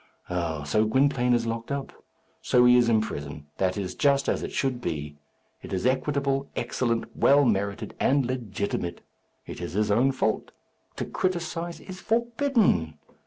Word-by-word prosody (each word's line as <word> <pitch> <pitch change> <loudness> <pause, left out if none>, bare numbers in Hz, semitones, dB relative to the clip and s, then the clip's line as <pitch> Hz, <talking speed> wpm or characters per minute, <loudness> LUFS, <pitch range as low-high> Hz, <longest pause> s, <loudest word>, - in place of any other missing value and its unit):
Oh! 85 -4 -2
so 75 +9 +2
Gwynplaine 125 +1 +3
is 115 -1 0
locked 115 +2 -4
up! 140 -1 -3 0.5
So 125 0 +4
he 125 0 +7
is 120 -1 +4
in 110 -2 +4
prison. 70 -7 -6
That 95 0 +1
is 95 -3 -3
just 140 -1 +2
as - - 0
it - - -5
should 130 -3 -1
be. 75 -6 -4 0.4
It - - -10
is 95 +3 -2
equitable, 135 +1 0
excellent, 115 -2 -2
well 140 +1 +5
merited, 100 -2 -1
and 140 -1 +3
legitimate. 105 -7 -3 0.4
It - - -8
is 85 - -5
his 105 +1 +1
own 125 +6 +4
fault. 120 -5 -1 0.5
To - - -3
criticize 170 -2 -2
is 185 -1 -9
forbidden. 230 - +1
120 Hz, 160 wpm, -26 LUFS, 100-140 Hz, 0.5 s, he